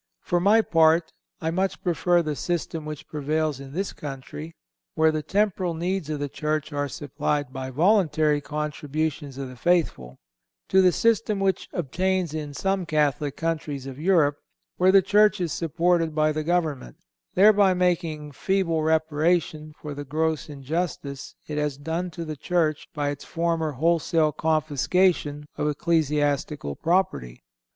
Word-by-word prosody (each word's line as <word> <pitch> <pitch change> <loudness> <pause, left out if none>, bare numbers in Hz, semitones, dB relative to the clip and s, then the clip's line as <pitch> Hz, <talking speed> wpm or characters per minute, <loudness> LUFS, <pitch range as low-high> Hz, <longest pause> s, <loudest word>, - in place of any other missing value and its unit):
For 175 - +1
my 210 +5 +4
part, 165 -1 +3 0.3
I 160 0 -1
much 190 +3 -1
prefer 175 0 +2
the 155 -2 -2
system 165 -1 -3
which 155 -1 -7
prevails 150 -1 -1
in 135 -1 -9
this 190 +4 -2
country, 150 +3 -8 0.4
where 160 0 +4
the 155 -1 -2
temporal 190 -1 0
needs 175 -1 -2
of 150 -1 -2
the 145 - -2
Church 155 +1 -3
are 145 0 -1
supplied 145 0 -2
by 130 0 -5
voluntary 155 - +2
contributions 150 -1 -3
of 135 -1 -4
the 130 - -10
faithful, 135 - 0 0.5
to 190 - +5
the 185 -1 +5
system 220 +1 +1
which 195 -1 0
obtains 180 +1 -1
in 150 -2 -5
some 195 +2 0
Catholic 145 -2 0
countries 155 -4 -3
of 135 0 -8
Europe, 155 -4 +3 0.4
where 185 +1 +5
the 195 0 +6
Church 210 +1 +4
is 175 -3 -1
supported 165 0 +1
by 155 0 +3
the 155 0 -2
government, 155 - -1 0.4
thereby 200 -1 +6
making 170 -4 0
feeble 170 +1 0
reparation 155 0 +1
for 150 -1 -6
the 145 +1 -6
gross 155 +2 -1
injustice 145 -1 -4
it 150 -1 -3
has 150 -2 -1
done 165 +5 -3
to 170 0 -6
the 155 -1 -5
Church 155 0 0
by 145 -1 0
its 145 -1 -5
former 165 -2 -1
wholesale 160 +1 +2
confiscation 155 0 +1
of 150 - 0
ecclesiastical 145 - 0
property. 160 - -1
155 Hz, 150 wpm, -25 LUFS, 145-175 Hz, 0.5 s, the